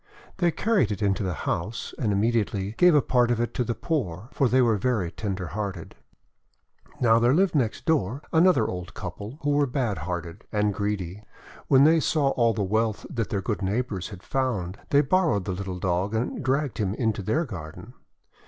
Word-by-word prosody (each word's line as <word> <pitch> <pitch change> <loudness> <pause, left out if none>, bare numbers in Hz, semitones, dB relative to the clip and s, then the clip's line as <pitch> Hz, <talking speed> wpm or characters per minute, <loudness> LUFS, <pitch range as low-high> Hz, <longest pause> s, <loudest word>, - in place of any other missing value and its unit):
They 175 -2 +3
carried 200 - +1
it 105 +1 -3
into 100 +1 +1
the 90 -4 -2
house, 105 +8 -3
and 110 -5 +1
immediately 105 -2 0
gave 180 -3 +6
a 145 - +4
part 125 -2 +2
of 120 -2 +1
it 120 0 -1
to 125 - 0
the 120 -1 -2
poor, 110 - -3
for 135 -4 +2
they 130 - +3
were 120 -3 +4
very 100 -5 0
tender 95 -5 -4
hearted. 100 -4 -5 1.1
Now, 115 -2 +4
there 120 +4 +4
lived 190 +2 +3
next 125 -8 0
door 140 - 0
another 160 -8 +5
old 90 -2 -5
couple, 100 - -7
who 145 - +1
were 145 0 +3
bad 120 -5 -1
hearted 85 +2 -5
and 105 -1 +1
greedy. 100 -1 -3 0.4
When 135 0 +6
they 160 +2 +6
saw 150 -3 +1
all 115 -4 +2
the 105 - 0
wealth 110 +2 0
that 115 -3 -2
their 100 -4 -1
good 105 0 -2
neighbours 100 -1 -2
had 95 -4 -11
found, 110 -9 -2
they 145 - +5
borrowed 150 - +1
the 95 - -2
little 95 0 -4
Dog, 95 +3 -1
and 115 +4 -2
dragged 135 -1 0
him 100 -1 0
into 110 -4 -1
their 145 - 0
garden. 80 - -9
110 Hz, 190 wpm, -26 LUFS, 95-130 Hz, 1.1 s, gave